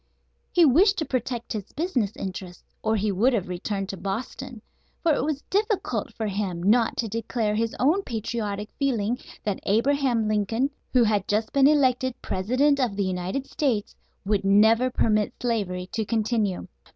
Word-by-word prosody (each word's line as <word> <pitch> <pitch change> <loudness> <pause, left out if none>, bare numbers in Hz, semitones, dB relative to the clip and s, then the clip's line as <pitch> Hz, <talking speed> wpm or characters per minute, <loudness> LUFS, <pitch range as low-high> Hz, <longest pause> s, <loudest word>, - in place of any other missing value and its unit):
He 345 -2 +5
wished 380 - +5
to 315 - -1
protect 245 -2 -3
his 210 -2 -6
business 260 - -1
interests, 185 -2 -6 0.2
or 220 0 +1
he 210 0 0
would 230 +8 +2
have 200 -6 0
returned 195 +2 -3
to 195 - -5
Boston; 230 +5 -5 0.4
for 330 -3 +4
it 265 - 0
was 295 -1 -2
difficult 415 0 0
for 220 - -3
him 195 -4 -2
not 225 +4 +3
to 230 - 0
declare 225 0 -1
his 225 +1 -1
own 315 +10 +3
patriotic 215 - -4
feeling 245 -4 0 0.2
that 205 -2 -2
Abraham 240 +1 +1
Lincoln, 215 +6 0 0.2
who 250 -2 +5
had 210 -3 +1
just 215 +2 0
been 275 -1 +6
elected 260 -4 +2
President 255 +9 +1
of 240 -6 0
the 200 -1 0
United 185 +8 -2
States, 250 -9 -1 0.3
would 200 0 +1
never 220 +5 +5
permit 215 -4 +1
slavery 200 -7 -1
to 220 - -1
continue. 215 -4 -1
225 Hz, 165 wpm, -25 LUFS, 205-260 Hz, 0.4 s, been